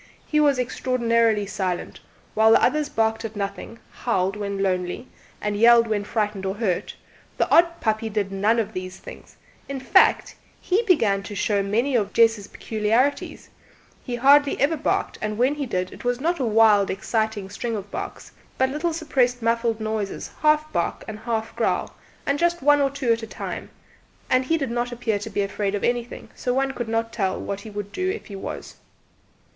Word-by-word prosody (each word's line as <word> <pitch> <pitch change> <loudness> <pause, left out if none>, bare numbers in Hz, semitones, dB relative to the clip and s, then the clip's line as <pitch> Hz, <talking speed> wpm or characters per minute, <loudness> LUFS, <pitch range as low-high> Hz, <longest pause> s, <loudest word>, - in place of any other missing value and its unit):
He 300 - +1
was 290 -3 +4
extraordinarily 230 -4 +1
silent; 185 -2 -3 0.3
while 220 +1 +5
the - - +4
others 300 -1 +2
barked 225 -2 0
at 220 -1 -6
nothing, 200 +2 -5
howled 195 -5 -1
when 200 -1 -3
lonely, 185 +5 -2 0.3
and 210 0 -2
yelled 230 +2 +6
when 210 -2 -1
frightened 210 -3 -2
or 190 0 -2
hurt, 205 -5 -2 0.4
the - - +2
odd 340 0 +5
puppy 220 0 0
did 205 -2 -2
none 205 +4 +2
of 225 -3 -1
these 185 0 -6
things; - - -12 0.3
in 275 -1 -3
fact, 260 - +3 0.3
he 385 +5 +1
began 225 - +3
to 205 +1 -8
show 200 0 +1
many 230 +7 0
of 210 -3 0
Jess's 225 -3 +3
peculiarities; 225 +6 -1 0.5
he 245 - -4
hardly 280 +3 +4
ever 295 +4 +2
barked, 300 - -1
and 210 0 -3
when 255 +4 +3
he 290 -2 -4
did 185 -4 -2
it - - -12
was 245 0 0
not 335 +4 0
a 260 - 0
wild 215 -3 +4
excited 215 -1 -2
string 230 +2 -3
of 205 -1 -7
barks - - -6 0.3
but 260 0 +2
little 320 +4 -1
suppressed 255 -7 0
muffled 230 0 +1
noises, 215 -2 -3
half 305 0 +2
bark 170 - -1
and 215 -1 -6
half 225 -1 -3
growl, - - -1 0.3
and 280 +1 0
just 345 -3 +1
one 290 0 +5
or 275 - +3
two 270 -3 -1
at 230 - -3
a 225 - -6
time; - - -6 0.6
and 255 0 +3
he 325 +5 +1
did 275 -6 -3
not 240 +1 -1
appear 230 -3 -1
to 210 - -6
be 205 -1 -1
afraid 200 0 -2
of 200 - -4
anything, 240 0 -2
so 250 0 -2
one 270 0 +1
could 240 -3 -5
not 225 0 -1
tell 190 -4 -1
what 200 0 -4
he 220 - -9
would 205 -1 -6
do 370 0 -1
if 415 +3 -4
he 200 - -9
was. 195 - -7
225 Hz, 190 wpm, -23 LUFS, 205-260 Hz, 0.6 s, yelled